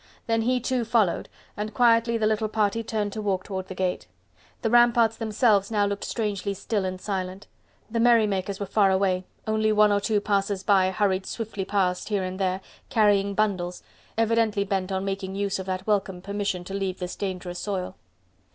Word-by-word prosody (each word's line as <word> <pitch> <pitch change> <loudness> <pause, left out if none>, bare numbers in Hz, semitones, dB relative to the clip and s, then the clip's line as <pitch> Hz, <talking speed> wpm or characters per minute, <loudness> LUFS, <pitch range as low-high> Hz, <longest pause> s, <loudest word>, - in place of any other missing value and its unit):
Then 225 0 +1
he, 250 +2 +1
too, 255 0 -1
followed, 220 -6 +1 0.3
and 210 +1 -5
quietly 235 -2 +4
the 220 - 0
little 215 0 +1
party 215 0 0
turned 215 -2 -2
to 215 - -4
walk 195 -3 -1
toward 190 -2 -5
the 185 - -7
gate. 185 -1 -2 0.6
The 225 - +2
ramparts 240 -2 +5
themselves 215 -3 +2
now 210 -2 +2
looked 200 0 -3
strangely 205 -3 -2
still 200 0 -2
and 185 0 -3
silent: 190 -1 -4 0.4
the 230 +1 -2
merrymakers 210 -5 +3
were 200 - -2
far 200 0 +3
away, 190 -1 +1 0.2
only 215 0 +1
one 210 0 +5
or 205 0 +2
two 210 +1 +1
passers 200 -1 0
by 190 -3 +4
hurried 190 -1 0
swiftly 210 -4 -4
past 190 -2 0
here 205 -3 0
and 185 +1 -4
there, 190 0 0 0.3
carrying 200 -2 +3
bundles, 185 -4 -1 0.3
evidently 225 -2 +2
bent 195 -1 -2
on 190 0 -1
making 195 -1 -3
use 200 -1 -1
of 190 - -6
that 185 0 -3
welcome 200 -3 0
permission 200 -1 -3
to 195 - -8
leave 195 -2 -2
this 180 -1 -5
dangerous 180 -2 -4
soil. 190 -3 -3
200 Hz, 185 wpm, -25 LUFS, 190-220 Hz, 0.6 s, ramparts